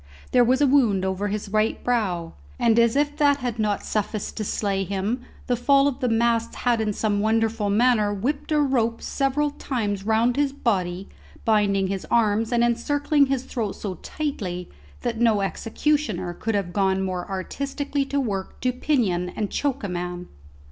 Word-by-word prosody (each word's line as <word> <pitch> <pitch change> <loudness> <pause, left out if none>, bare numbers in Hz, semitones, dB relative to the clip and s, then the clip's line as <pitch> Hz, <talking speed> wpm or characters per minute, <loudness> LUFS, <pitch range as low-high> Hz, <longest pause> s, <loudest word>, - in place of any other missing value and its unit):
There 245 - +5
was 260 +3 +2
a - - +6
wound 235 -9 +3
over 190 +2 -1
his 205 0 -3
right 215 +2 0
brow; 190 -9 -1 0.2
and 230 0 +3
as 235 0 +4
if 290 +1 +1
that 285 -2 +4
had 245 -4 -4
not 210 -2 0
sufficed 215 -1 -2
to 215 - -1
slay 200 -1 -1
him, 200 +6 -2 0.2
the 245 - +1
fall 275 +3 +4
of 280 - -2
the 250 - 0
masts 230 0 +1
had 240 -2 +3
in 215 -1 0
some 205 0 0
wonderful 220 0 +1
manner 215 -1 +3
whipped 260 +11 -2
a 305 - +3
rope 240 -5 +1
several 285 +2 0
times 210 -9 -3
round 225 +4 +2
his 285 -1 +1
body, 190 -8 -1 0.4
binding 205 -3 +3
his 190 0 -3
arms 225 -1 +2
and 235 -1 +3
encircling 285 +5 +2
his 265 -2 -1
throat 225 -6 -3
so 200 -3 -4
tightly, 190 - -4 0.3
that 230 -2 -2
no 220 -4 +4
executioner 220 - -1
could 225 +5 -2
have 185 -3 -2
gone 190 -1 +1
more 185 0 -3
artistically 280 +8 -2
to 280 +1 -1
work 200 -7 -3
to 250 0 +1
pinion 220 -10 0
and 210 +2 -4
choke 285 -6 -1
a - - -1
man. 180 0 -4
225 Hz, 175 wpm, -24 LUFS, 200-260 Hz, 0.4 s, a